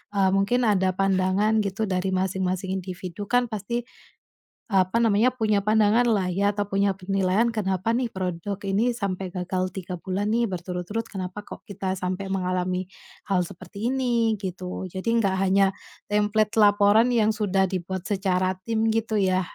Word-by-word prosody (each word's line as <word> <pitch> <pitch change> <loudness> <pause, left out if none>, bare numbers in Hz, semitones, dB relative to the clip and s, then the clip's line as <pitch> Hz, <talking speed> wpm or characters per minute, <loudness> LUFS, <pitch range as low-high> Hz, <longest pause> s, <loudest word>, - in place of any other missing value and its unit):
eee, 195 -1 +4
mungkin 200 +6 +2
ada 190 -2 +2
pandangan 195 +3 +2
gitu 200 +2 -2
dari 185 0 -1
masing-masing 185 0 -1
individu 185 +1 -6
kan 245 +1 +2
pasti, 215 +3 -2 0.9
apa 195 +2 +2
namanya 225 +2 +3
punya 215 -5 0
pandangan 215 +2 +4
lah 205 -6 +1
ya 200 +3 +1
atau 205 - -2
punya 195 0 +2
penilaian, 195 +3 +1
kenapa 195 -3 -1
nih 245 +2 +1
produk 185 +1 -3
ini 205 +5 +1
sampai 190 -5 -4
gagal 185 0 -2
3 185 -1 -5
bulan 190 +4 -2
nih 235 +2 +2
berturut-turut, 185 +3 -4
kenapa 185 0 -5
kok - - -11
kita 190 -3 -3
sampai 185 +2 -3
mengalami 185 -1 -1 0.5
hal 180 - +3
seperti 185 +6 -5
ini, 240 -4 +1
gitu. 185 -1 -5
Jadi 185 +4 -4
enggak 195 -4 +1
hanya 195 +1 +4 0.4
template 210 +1 +1
laporan 205 +3 +5
yang 220 -3 +3
sudah 195 -3 +1
dibuat 185 0 -4
secara 185 -2 0
tim 225 +1 0
gitu 225 -1 0
ya, 185 -2 +2
195 Hz, 155 wpm, -25 LUFS, 185-215 Hz, 0.9 s, laporan